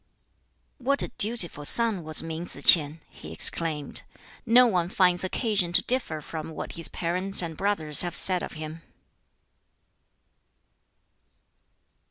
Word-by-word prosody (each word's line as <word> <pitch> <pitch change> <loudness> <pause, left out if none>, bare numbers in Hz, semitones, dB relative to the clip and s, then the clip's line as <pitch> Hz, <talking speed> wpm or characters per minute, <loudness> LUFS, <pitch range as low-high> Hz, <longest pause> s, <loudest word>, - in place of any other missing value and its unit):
"What 275 +2 -1
a - - -6
dutiful 200 -9 +2
son 220 +2 +1
was 155 0 -3
Min 165 +1 -7
Tsz - - -5
k'ien!" 155 -1 +6
he 75 - -13
exclaimed. 150 - +1 0.5
"No 245 +2 +5
one 180 -7 -1
finds 180 -2 +1
occasion 195 -2 0
to - - +2
differ 235 -12 -2
from 160 +1 -8
what 160 - -8
his 165 -1 -2
parents 185 +3 0
and 165 -2 -6
brothers 160 -6 0
have 175 -1 -1
said 185 -2 -1
of - - -8
him." 155 +1 -9
175 Hz, 130 wpm, -25 LUFS, 160-200 Hz, 0.5 s, k'ien